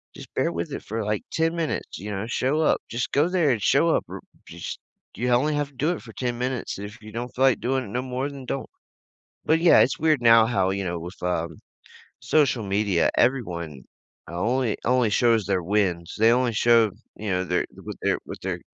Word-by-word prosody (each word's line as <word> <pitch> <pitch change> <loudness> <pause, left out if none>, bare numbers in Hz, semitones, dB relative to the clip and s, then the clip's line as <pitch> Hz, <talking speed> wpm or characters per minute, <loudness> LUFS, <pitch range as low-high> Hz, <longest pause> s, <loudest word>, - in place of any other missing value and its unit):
just - - -11
bear - - +1
with 85 0 -4
it - - -5
for, 110 +1 -4
like, 105 0 -2
10 165 +1 0
minutes, 165 -2 -3
you 105 +3 -6
know? 100 +1 -3
Show 135 +6 0
up. 155 - +3
Just 120 0 -3
go 145 +4 +3
there 180 -5 +2
and 120 -4 +2
show 145 +10 +3
up. - - +2
R - - -7 0.3
just - - -7 0.4
you 125 +1 -1
only 140 +5 +2
have 145 -1 -1
to - - -25
do 150 +5 0
it 175 - -4
for 115 -2 -12
10 120 -2 -3
minutes. 125 +1 -3
If 105 +3 -9
you 110 0 -11
don't 120 +3 -5
feel 130 - +2
like 130 - +3
doing 130 +1 0
it - - -9
no 125 +5 -2
more, 130 +2 -3
then 140 -2 -9
don't," 135 +2 -4 0.8
but, 160 +1 +3
yeah, 170 - +6
it's - - +2
weird 155 -4 +2
now 115 -1 +7
how, 95 -6 +1
you 100 0 -2
know, 85 -1 -3
with, 90 +3 -9
um, 85 -2 -2 0.6
social 140 -7 +2
media, 100 -3 +1
everyone 85 - 0 0.5
only 115 +7 0
only 125 -2 +3
shows 115 -1 +3
their 95 -2 0
wins. 90 -3 0
They 115 +1 +6
only 125 -1 +2
show, 115 -1 +4 0.2
you 105 0 -5
know, 90 0 0
their 90 0 +1 0.2
what - - -7
they're - - +1
what - - -8
they're - - -3
115 Hz, 220 wpm, -24 LUFS, 100-130 Hz, 0.8 s, now